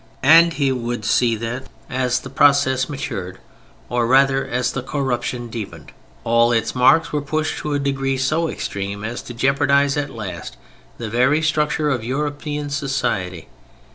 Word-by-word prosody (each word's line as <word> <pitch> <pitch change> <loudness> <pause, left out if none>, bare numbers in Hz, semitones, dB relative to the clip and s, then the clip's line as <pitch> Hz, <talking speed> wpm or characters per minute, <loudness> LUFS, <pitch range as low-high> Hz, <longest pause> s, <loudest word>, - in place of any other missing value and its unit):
And 165 +4 +7
he 140 -4 +1
would 120 -1 -3
see 120 -2 +2
that 115 +4 -5 0.2
as 130 -1 0
the 135 - -9
process 135 -2 +3
matured, 100 -10 -5 0.5
or 120 0 0
rather 135 +1 +4
as 125 0 -1
the 135 - -3
corruption 125 -3 -2
deepened, 100 -10 -8 0.3
all 115 +1 +3
its 115 -1 0
marks 145 +6 +4
were 150 - 0
pushed 155 +2 -2
to 150 -1 -2
a - - 0
degree 135 -1 -1
so 155 +5 0
extreme 100 +1 -4
as 115 +3 -4
to 120 - -9
jeopardize 140 +2 +2
at 145 -1 -1
last 90 - -7 0.4
the 115 - -5
very 130 +8 +2
structure 150 -1 +1
of 120 -4 -1
European 145 +3 -3
society. 105 - -2
130 Hz, 155 wpm, -20 LUFS, 120-145 Hz, 0.5 s, And